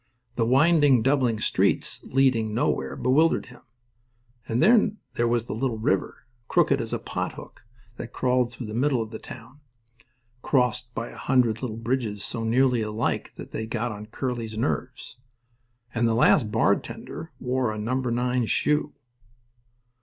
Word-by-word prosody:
The 115 -2 0
winding, 140 -2 +4
doubling 130 -5 +2
streets, - - 0
leading 125 -5 +2
nowhere, 120 - 0
bewildered 155 +6 +2
him. - - -17 0.9
And 115 +1 -1
then 215 - +4 0.2
there 120 -2 +1
was 120 0 0
a - - -3
little 115 0 -1
river, 110 +1 -1 0.2
crooked - - +2
as - - -4
a - - 0
pot - - -4
hook, - - -12 0.4
that 120 - -7
crawled 125 -1 +1
through 120 +1 -7
the 105 - -7
middle 125 0 +1
of 110 - -11
the 110 - -7
town, 125 +4 -12 0.8
crossed 125 -2 +1
by 115 - -4
a - - -12
hundred 120 -4 +1
little 115 -4 -4
bridges 115 -3 -2
so 115 - -4
nearly 125 +1 +2
alike 110 +1 -2
that - - -10
they 110 - -4
got 120 +1 -2
on 105 0 -8
Curly's 115 -2 -4
nerves. 125 +1 -3 0.8
And 115 0 +1
the 115 - +1
last 115 0 +4
bartender 110 - -1
wore 125 -2 0
a 110 - -5
number 125 +4 -1
nine 125 0 0
shoe. 150 +3 +1
120 Hz, 155 wpm, -25 LUFS, 115-130 Hz, 0.9 s, winding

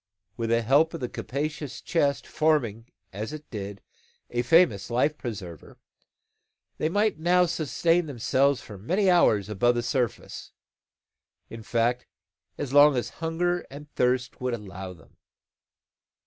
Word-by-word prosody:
With 115 -1 -3
the 115 0 +2
help 150 +8 +3
of - - -5
the 125 - -3
capacious 145 +2 -4
chest 145 -5 0
forming, 125 -8 0 0.2
as 110 +8 -5
it 155 -1 -9
did, 100 -3 -6 0.5
a 120 - 0
famous 125 - +3
life 130 +6 +1
preserver 95 - -8 1.0
they 155 - +1
might 205 -1 +1
now 180 +2 +4
sustain 165 +1 +1
themselves 135 +1 +1
for 105 -3 -11
many 185 - +2
hours 110 - +4
above 120 +4 +2
the 120 - -1
surface, 125 -2 -3 1.0
in 115 - -8
fact, 120 +3 0 0.5
as 135 -2 -4
long 145 0 +7
as 120 - -2
hunger 175 +2 0
and 145 +2 -11
thirst 125 +1 0
would 125 -1 -1
allow 95 -3 -8
them. 85 - -21
130 Hz, 135 wpm, -26 LUFS, 115-155 Hz, 1.0 s, long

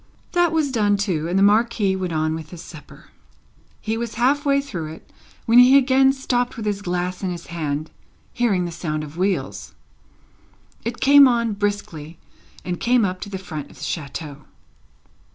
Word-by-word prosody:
That 350 -2 +2
was 310 -4 0
done 205 -4 +2
too, 180 -6 -1
and 175 +2 0
the 195 - +4
Marquis 210 -1 +3
went 185 -2 -3
on 155 0 0
with 160 -1 -7
his 175 -1 -10
supper. 160 -3 -14 0.7
He 220 +1 -3
was 235 -2 -4
half 280 +6 +1
way 280 0 +4
through 170 - -5
it, - - -16 0.3
when 230 +2 +6
he 255 +2 +8
again 265 0 +4
stopped 250 -2 -2
with 220 - -5
his 205 -1 -2
glass 180 -1 -3
in 190 - -2
his 175 -1 -6
hand, 155 -2 -3 0.4
hearing 200 -7 +1
the 170 - -5
sound 155 -3 -4
of 150 +1 -10
wheels. 190 +2 -2 1.1
It 235 +1 -5
came 280 0 +8
on 235 -3 +1
briskly, 200 -6 -4 0.5
and 180 -1 -3
came 240 -2 +3
up 185 -1 -4
to 205 - -6
the 195 - -4
front 155 -6 -7
of - - -17
the - - -10
chateau. 150 -1 -6
200 Hz, 180 wpm, -22 LUFS, 170-245 Hz, 1.1 s, he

